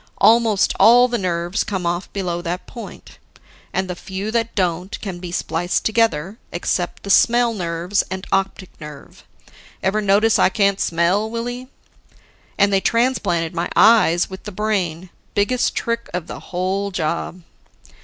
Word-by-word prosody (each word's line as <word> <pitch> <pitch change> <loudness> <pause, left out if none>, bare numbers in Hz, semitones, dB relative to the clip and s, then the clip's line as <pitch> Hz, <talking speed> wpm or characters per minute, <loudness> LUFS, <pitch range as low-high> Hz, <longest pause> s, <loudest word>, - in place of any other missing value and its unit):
Almost 225 -3 +4
all 245 +2 +7
the 240 -1 -2
nerves 175 +1 -1
come 190 -3 -4
off 175 +2 -2
below 175 -3 -3
that 175 +1 -4
point; 235 - -11 0.5
and 190 0 -1
the 180 - -4
few 190 +4 -5
that 230 0 -1
don't 180 0 -1
can 190 -4 -6
be 175 -1 -7
spliced 175 0 -1
together, 220 -4 +1
except 175 +1 -2
the 200 - -2
smell 235 +2 +4
nerves 175 0 -1
and 190 0 -5
optic 195 -1 -1
nerve. 150 -2 -11 0.6
Ever 205 +3 +1
notice 210 +2 +3
I - - +5
can't 200 -1 +1
smell, 175 +6 +1
Willie? 245 +2 -5 0.9
And 200 0 +3
they 195 - +3
transplanted 200 -10 0
my 170 +1 -2
eyes 215 -6 +5
with 190 0 -9
the 210 - -6
brain 185 -4 -2 0.2
biggest 230 +5 +1
trick 235 0 -2
of 180 -3 -3
the - - -8
whole 190 +3 -2
job." 170 0 -3
195 Hz, 150 wpm, -20 LUFS, 175-220 Hz, 0.9 s, all